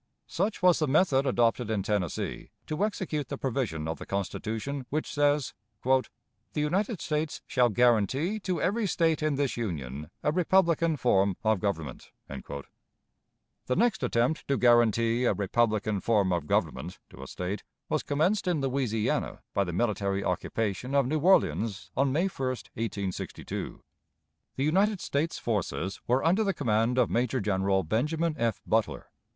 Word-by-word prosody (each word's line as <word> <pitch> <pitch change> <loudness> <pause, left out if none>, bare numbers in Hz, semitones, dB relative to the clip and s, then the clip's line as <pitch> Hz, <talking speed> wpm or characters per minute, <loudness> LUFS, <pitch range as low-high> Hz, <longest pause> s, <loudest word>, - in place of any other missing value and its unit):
Such 200 +2 -2
was 180 -2 +5
the 155 - +1
method 140 -2 +3
adopted 120 -1 +2
in 105 -3 0
Tennessee 100 -5 -2 0.2
to 155 +6 -2
execute 165 - -2
the 140 - -5
provision 115 - -2
of 80 - -4
the - - -7
Constitution 110 +7 -3
which 155 +3 -2
says: 145 -2 +2 0.3
"The 130 +1 +5 0.6
United 185 +7 0
States 150 0 -2
shall 125 -2 +3
guarantee 125 - +2
to 185 -4 -2
every 210 +3 +1
State 165 -3 +1
in 155 -2 +1
this 140 -3 -1
Union 75 - -4
a 150 - +2
republican 170 -2 +2
form 100 -7 +2
of 110 -2 +2
government." 85 -7 -3 0.2
The 70 - -9
next 235 -1 +2
attempt 125 +4 0
to 140 - +1
guarantee 120 0 +3
"a - - +2
republican 105 0 0
form 100 -5 +2
of 85 -4 -2
government" 90 +4 -1
to - - -12
a 65 - -8
State 95 +6 -4 0.3
was - - 0
commenced 180 +8 0
in 175 -4 +1
Louisiana 130 -5 -1
by 100 - +2
the 90 - -4
military 100 0 0
occupation 115 +7 -2
of 140 -2 +4
New 155 +5 0
Orleans, 110 - +2
on 135 -1 +2
May 165 +7 +2
1, 135 -9 -2 0.3
1862. 100 -4 -4 0.7
The 135 - -1
United 195 +7 +2
States 155 +2 -1
forces 100 -3 -2
were 125 +2 +2
under 185 +7 +3
the 195 -3 0
command 115 -2 +1
of 125 -3 +3
Major 125 +2 +1
General 95 -2 +1
Benjamin 155 - 0
F. 115 -1 -1
Butler. 110 -2 -1
125 Hz, 150 wpm, -28 LUFS, 105-155 Hz, 0.7 s, was